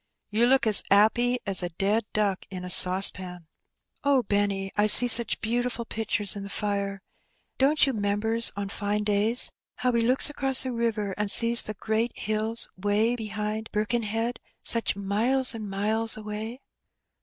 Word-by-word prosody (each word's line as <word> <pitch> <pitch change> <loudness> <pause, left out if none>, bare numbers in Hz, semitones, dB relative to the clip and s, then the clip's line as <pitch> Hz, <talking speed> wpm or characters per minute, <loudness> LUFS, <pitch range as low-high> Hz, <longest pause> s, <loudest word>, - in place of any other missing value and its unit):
"You 225 +3 +1
look 265 0 +2
as 215 -2 +7
'appy 240 +5 +2
as 195 -1 +2
a 175 - -2
dead 200 +6 -3
duck 205 -3 -3
in 185 -2 -9
a 180 - -4
saucepan." 180 -1 +1 0.3
" - - -46
Oh, 280 -3 0
Benny, 200 -2 -3
I 210 0 +1
see 245 +3 +8
such 235 -1 +4
beautiful 240 +1 -4
pictures 220 -2 -3
in 200 - -8
the 200 - -10
fire. 200 -1 -5 0.6
Don't 290 +3 +2
you 270 - -3
'members 220 +2 0
on 200 0 -6
fine 205 +1 -4
days 210 +3 +5 0.2
how 250 - -2
we 235 -1 -1
looks 250 +3 +2
across 270 -3 +6
the 260 - -5
Tiver, 225 -4 -4
and 210 -1 -2
sees 235 +2 +5
the 215 - -6
great 220 +3 -4
hills 215 +2 -3
'way 205 +5 -2
behind 215 -1 -6
Birkenhead, 225 +2 -4 0.2
such 230 -4 0
miles 225 +7 -1
an' 215 -3 -9
miles 220 +3 -1
away?" 215 +4 -9
215 Hz, 165 wpm, -24 LUFS, 200-235 Hz, 0.6 s, see